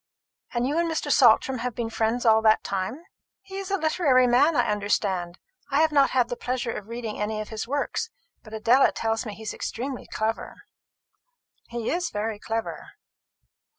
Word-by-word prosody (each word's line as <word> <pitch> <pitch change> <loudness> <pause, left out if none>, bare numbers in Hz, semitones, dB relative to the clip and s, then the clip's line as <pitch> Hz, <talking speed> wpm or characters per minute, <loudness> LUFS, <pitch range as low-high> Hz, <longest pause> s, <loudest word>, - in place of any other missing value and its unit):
And 240 +1 +1
you 300 +4 0
and 340 0 +1
Mr. 305 -2 -2
Saltram 255 0 +5
have 245 -1 -3
been 230 -1 -3
friends 225 +2 0
all 220 -1 +6
that 220 0 +4
time? 200 - -3 0.4
He 390 0 -8
is 390 -1 -5
a 395 - +1
literary 310 -6 +3
man, 270 +6 +4
I - - +2
understand. 195 -4 -1 0.3
I 280 +1 +2
have 320 -1 +3
not 280 -2 +4
had 250 -2 +2
the 245 - -4
pleasure 250 -1 -2
of 210 -2 -7
reading 230 -2 -5
any 215 +1 -2
of 215 - -5
his 220 0 -5
works; 285 - -2 0.3
but 215 - -14
Adela 230 +5 +4
tells 225 +1 -1
me 210 - -6
he 220 - -11
is 215 - -4
extremely 255 +2 -5
clever." 220 +1 -3 1.1
"He 235 -1 -3
is 345 0 -1
very 210 0 -3
clever." 225 +1 -4
235 Hz, 185 wpm, -25 LUFS, 220-275 Hz, 1.1 s, all